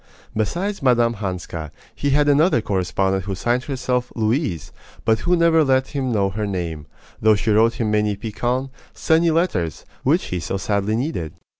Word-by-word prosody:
Besides 175 - -2
Mme. 120 -3 +3
Hanska, 90 -6 -5 0.2
he 145 - -2
had 145 +1 +3
another 145 0 +4
correspondent 95 -1 -1
who 100 -1 -3
signed 120 +6 0
herself 125 -3 -2
"Louise," 110 - -1 0.3
but 110 -1 +3
who 175 +7 +2
never 165 -2 +4
let 130 -1 +2
him 135 -3 -2
know 100 -3 +1
her 105 +2 -3
name, 85 -6 -4 0.3
though 110 0 +5
she 105 +2 0
wrote 110 +2 +4
him 110 -3 -1
many 105 -1 +1
piquant, 120 +6 -2 0.2
sunny 165 +1 +3
letters, 130 - 0 0.2
which - - +2
he 90 - -1
so 85 +4 -3
sadly 100 +1 0
needed. 115 - -3
110 Hz, 165 wpm, -21 LUFS, 100-135 Hz, 0.3 s, though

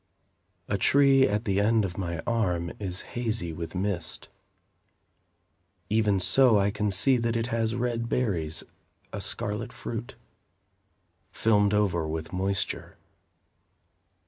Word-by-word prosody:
A 100 - -1
tree, 135 +3 +5
at 105 +3 -1
the 100 -2 +1
end 110 +1 +3
of 90 -2 -5
my 85 -4 -3
arm, 90 -8 0
is 95 -2 -4
hazy 110 -8 -2
with 85 +2 -6
mist. 90 -3 -2 1.6
Even 105 -3 +2
so, 120 +4 +5
I 100 0 +2
can 105 +1 -1
see 125 +8 +3
that 115 -1 -1
it 115 0 0
has 115 0 0
red 120 -1 -2
berries, 85 -12 -1 0.5
A - - -4
scarlet - - -3
fruit, - - -6 1.2
Filmed 105 -2 +2
over 90 -6 +1
with 80 +2 -5
moisture. 95 +1 -2
105 Hz, 120 wpm, -27 LUFS, 90-115 Hz, 1.6 s, tree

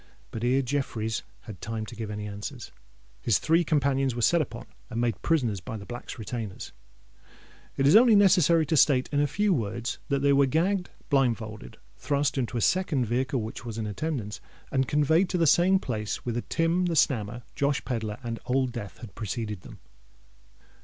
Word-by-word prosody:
But 115 - -5
ere 130 +3 +2
Jeffreys 115 -5 -2 0.2
had 105 -6 -10
time 110 0 -4
to 120 - -10
give 110 -2 -5
any 105 0 -5
answer, 100 0 -6 0.6
his 115 - +3
three 165 +2 +2
companions 135 -4 +1
were 120 - -2
set 170 +6 +4
upon 120 -5 -6 0.2
and 115 -1 -4
made 120 -2 0
prisoners 125 - +1
by 110 +5 -6
the 100 - -9
Black's 120 +4 -7
retainers. 110 -3 -6 1.1
It 135 - +2
is 145 - +6
only 230 0 +7
necessary 175 -5 +5
to 160 - 0
state, 130 -2 +4
in 145 - +1
a 145 - +3
few 205 +7 +1
words, 115 - -3
that 140 -1 0
they 140 0 +5
were 140 0 +4
gagged, 175 +6 +1 0.2
blindfolded, 115 - -1 0.2
thrust 145 0 0
into 125 -2 -2
a - - -1
second 160 - +2
vehicle 125 +1 -1
which 110 - -7
was 115 -3 -6
in 110 - -2
attendance, 110 -1 -4 0.3
and 130 -1 +1
conveyed 160 +5 +3
to 180 - 0
the 170 - +3
same 175 +5 +5
place 105 - -4
whither 120 0 -1
Tim 170 +5 +1
the 170 - -1
Snammer, 120 -5 +1
Josh 140 0 0
Pedler, 110 -4 -3
and 115 -1 -4
Old 130 0 +1
Death 115 -5 -7
had 115 -5 -9
preceded 110 -2 -4
them. - - -12
130 Hz, 185 wpm, -27 LUFS, 110-150 Hz, 1.1 s, only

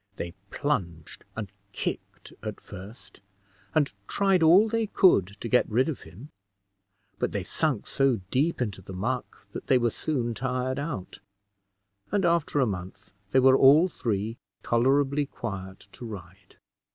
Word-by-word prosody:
They 85 -3 -5 0.2
plunged 85 - -3
and - - -5 0.2
kicked - - -5
at - - -5
first, 100 +2 -12 0.5
and 145 -6 +2
tried 195 -3 +2
all 175 +7 +7
they 225 0 0
could 180 - +4
to - - -3
get 125 +2 +3
rid 125 +6 +2
of 155 -6 -4
him, 120 +12 -12 0.9
but - - -1
they - - -2
sunk - - -1
so 135 -5 +1
deep 145 0 +1
into 100 -5 -5
the 95 0 -10
muck 120 +7 -4
that - - -7
they 130 - +5
were 120 -2 +1
soon 120 -5 -2
tired 130 +2 -2
out; 140 - -5 0.9
and 200 -3 +2
after 170 -4 +2
a 130 - +4
month, 100 0 -6 0.2
they 130 - +4
were 130 0 +6
all 145 +6 +7
three 110 - -2 0.3
tolerably 140 +4 +2
quiet 95 -6 -7
to 125 - -10
ride. 95 -2 -11
125 Hz, 150 wpm, -27 LUFS, 100-145 Hz, 0.9 s, all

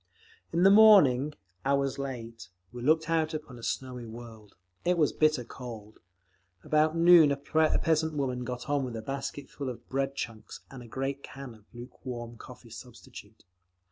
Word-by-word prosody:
In 170 +2 +1
the 195 - +7
morning, 155 - +6 0.3
hours 140 0 0
late, 115 -4 -7 0.2
we 120 - -8
looked 155 +5 +2
out 160 -1 0
upon 145 -6 -8
a - - -11
snowy 125 +1 -4
world. 110 -2 -12 0.3
It 180 0 +1
was 155 -3 +2
bitter 155 -4 +2
cold. 115 -3 -10 0.6
About 155 +1 +2
noon 165 -3 +7
a 140 - 0
peasant 160 +1 +1
woman 130 -3 -2
got 125 +2 -6
on 145 -1 0
with 125 -3 -5
a 110 - -6
basket 140 +2 -5
full 140 -2 -6
of 125 - -9
bread 135 +1 -1
chunks 115 -4 -7
and 130 -2 -9
a 120 - -11
great 135 +3 -4
can 135 -3 -9
of 110 -2 -19
luke 120 +1 -12
warm 120 -3 -6
coffee 120 -1 -13
substitute. 115 -2 -13
135 Hz, 170 wpm, -29 LUFS, 120-155 Hz, 0.6 s, the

